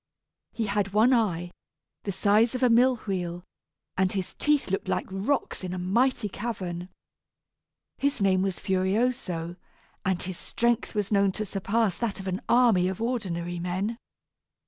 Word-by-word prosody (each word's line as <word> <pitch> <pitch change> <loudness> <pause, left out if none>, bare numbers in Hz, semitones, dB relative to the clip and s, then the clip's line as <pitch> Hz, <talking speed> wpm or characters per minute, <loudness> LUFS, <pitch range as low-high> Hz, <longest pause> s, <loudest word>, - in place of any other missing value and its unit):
He 225 - -2
had 200 -1 -1
one 225 +5 +5
eye, 175 -7 +1 0.5
the 200 - -1
size 210 +5 +3
of 255 - -1
a 250 - +5
mill 250 +2 +5
wheel, 175 -3 -3 0.5
and 190 0 +2
his 190 -3 -3
teeth 295 -9 +1
looked 195 - -1
like - - 0
rocks 200 +4 -1
in 185 0 -3
a - - -4
mighty 230 +6 +1
cavern. 185 -5 -5 1.1
His 280 -2 0
name 190 -2 +3
was 190 -2 -1
Furioso, 190 -3 -1 0.5
and 185 -1 0
his 185 -1 -5
strength 235 -1 0
was 205 -1 -1
known 200 -1 +4
to 215 - -3
surpass 200 0 0
that 230 -5 -2
of 190 - -6
an 185 0 -2
army 230 -7 +5
of 190 -1 -3
ordinary 180 -8 -2
men. 185 +6 -2
200 Hz, 155 wpm, -27 LUFS, 185-230 Hz, 1.1 s, one